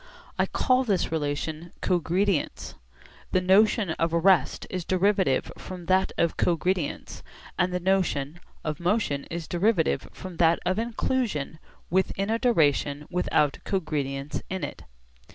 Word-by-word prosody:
I - - +3
call 255 0 +2
this 200 -9 0
relation 155 +2 -3
'cogredience.' 180 0 0 0.6
The 185 - +4
notion 195 +1 +4
of 165 +1 0
rest 170 -2 +3
is 185 -2 -4
derivative 185 -6 +1
from 180 -2 -8
that 190 +2 +2
of 170 -1 +1
cogredience, 175 -1 -1 0.4
and 180 0 +2
the 180 - -1
notion 175 -5 0 0.2
of 155 -1 -3
motion 175 -6 0
is 170 -1 -6
derivative 180 -1 +1
from 185 -3 -9
that 165 0 +4
of 185 +4 +1
inclusion 225 - -2 0.3
within 195 +2 0
a 225 - +1
duration 150 - +2
without 160 -5 +1
cogredience 145 -6 -2
with 190 0 -3
it. - - -5
180 Hz, 130 wpm, -26 LUFS, 155-195 Hz, 0.6 s, The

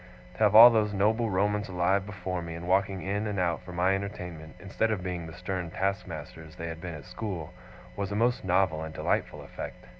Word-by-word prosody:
To - - -16
have 105 -1 +4
all 120 +2 +12
those 105 -2 +1
noble 110 +4 +2
Romans 105 +1 0
alive 95 +2 +1
before 95 -3 -4
me, 85 -1 -6
and 85 +1 -7
walking 95 0 +1
in 100 +3 -1
and 105 -1 -3
out 85 -2 0
for 90 0 -10
my 90 +2 +2
entertainment, 90 -5 -5
instead 100 +3 -1
of 105 -5 -2
being 90 -2 -4
the 80 - -9
stern 90 -1 -4
taskmasters 85 -4 -4
they 85 - -6
had 80 0 -7
been 85 -2 -5
at 75 -4 -10
school, 90 -6 -5 0.4
was 100 0 -3
a - - -2
most 120 +3 +1
novel 90 -3 +2
and 80 0 -7
delightful - - -1
effect. - - -8
95 Hz, 210 wpm, -28 LUFS, 85-105 Hz, 0.4 s, all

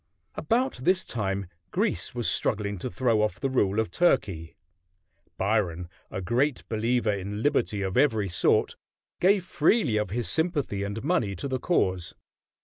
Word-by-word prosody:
About 250 +3 0
this 180 +9 +1
time 100 -3 -2 0.2
Greece 90 - -1
was 120 -2 -1
struggling 100 -3 0
to - - -4
throw 115 +3 +1
off 105 -5 -1
the 135 - -1
rule 105 -5 +2
of 110 - -1
Turkey. 95 - +1 0.8
Byron, 95 -4 0 0.2
a 95 - -5
great 120 +8 0
believer 115 0 +1
in 100 +2 -4
liberty 120 -8 +1
of 95 -1 -3
every 115 -7 +3
sort, 85 -1 +2 0.4
gave 190 0 +3
freely 170 - +2
of 105 -3 -1
his 115 +1 -2
sympathy 145 - 0
and 100 +3 -4
money 135 - 0
to 90 - -5
the 130 -1 -2
cause. 95 - 0
110 Hz, 150 wpm, -27 LUFS, 100-140 Hz, 0.8 s, every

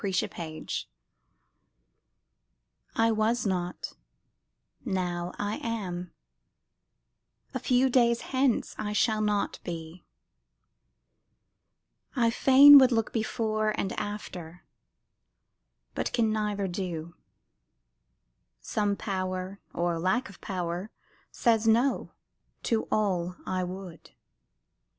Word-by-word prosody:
THE 205 - -2
MYSTERY 170 -4 -3 2.3
I 225 0 +3
was 220 +2 +1
not; 180 -2 -2 0.9
now 180 -4 -2
I 205 +1 -2
am 185 -6 -4 1.4
a - - -2
few 255 +1 +3
days 235 -2 +3
hence 260 -2 0
I 210 0 -2
shall 215 0 +2
not 210 -1 0
be; 165 0 -7 2.1
I 235 -3 +3
fain 280 +4 +9
would 260 -1 +5
look 225 -2 0
before 215 -1 -1
And 190 - -1
after, 185 -5 -6 1.3
but - - -2
can 225 -3 +2
neither 210 -2 -1
do; 175 -3 -4 1.5
some 205 - -1
Power 185 -1 -3
Or 170 -1 -1
lack 190 +9 0
of 195 - -15
power 180 +1 -3 0.4
says 225 -2 +2
"no" 240 +5 +2 0.5
to 225 -2 0
all 180 -4 0
I 185 -1 -1
would. 180 -1 -8
205 Hz, 95 wpm, -28 LUFS, 180-225 Hz, 2.3 s, fain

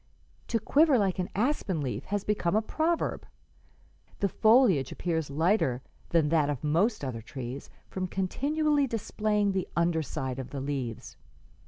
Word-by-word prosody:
'To 230 - 0
quiver 290 +3 +4
like 195 -4 0
an 180 - -1
aspen 210 - 0
leaf 130 -4 -3
has 205 0 -2
become 205 -3 0
a 215 - +4
proverb. 320 +8 -1 0.9
The 200 - 0
foliage 215 - +4
appears 160 -4 -2
lighter 145 - +1 0.3
than 160 -3 +2
that 155 -2 +2
of 145 -2 -3
most 170 +5 +1
other 120 -4 -4
trees, 130 +3 -7 0.2
from 185 -1 -3
continually 285 - 0
displaying 210 -2 0
the 190 -1 -2
under 170 -1 +2
side 135 -4 -4
of 130 - -6
the 140 - -5
leaves. 135 -5 -4
180 Hz, 150 wpm, -28 LUFS, 145-215 Hz, 0.9 s, quiver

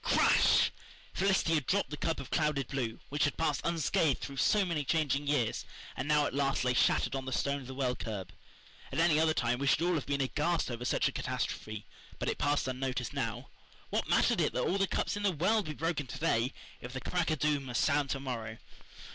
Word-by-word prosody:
Crash! - - +4 0.4
Felicity 190 -4 +2
had 150 -4 0
dropped 200 -3 +1
the - - -2
cup 165 +2 -1
of 125 - -8
clouded 150 -5 0
blue, 125 -5 -2
which 145 +1 0
had 145 - -2
passed 150 -3 0
unscathed 160 -3 +1
through 140 -1 -7
so 205 +7 +3
many 165 -5 -1
changing 145 -1 0
years, 135 -6 +1 0.3
and 135 - -3
now 150 -1 +3
at - - -3
last 135 -1 +1
lay 125 - +2
shattered 125 +2 +2
on 135 -1 -3
the 130 - -4
stone 140 +2 0
of 125 - -10
the 130 - -7
well 130 -2 0
curb. 100 -5 -5 0.6
At 135 - -4
any 160 -2 +4
other 160 0 +3
time 120 0 0
we 140 - -1
should 155 - +3
all 180 +1 +2
have 155 -5 -2
been 140 0 0
aghast 150 +3 0
over 120 +1 -5
such - - +2
a - - -1
catastrophe, 110 -1 -4 0.3
but - - -2
it - - -3
passed 145 -1 +1
unnoticed 130 -1 -3
now. - - -3 0.4
What - - -1
mattered - - +3
it - - +1
that - - 0
all 195 - 0
the 195 - +2
cups - - -1
in 205 - -4
the 205 -1 +2
world 190 +6 +1
be 155 - -4
broken 160 -3 -2
to - - -7
day 130 -4 +1 0.3
if 125 +1 -8
the 130 - -3
crack 175 -2 -1
o' 155 - +2
doom 150 -2 0
must 125 -2 0
sound 145 -2 +2
to 135 - -1
morrow? 115 -5 -5
145 Hz, 230 wpm, -31 LUFS, 130-160 Hz, 0.6 s, Crash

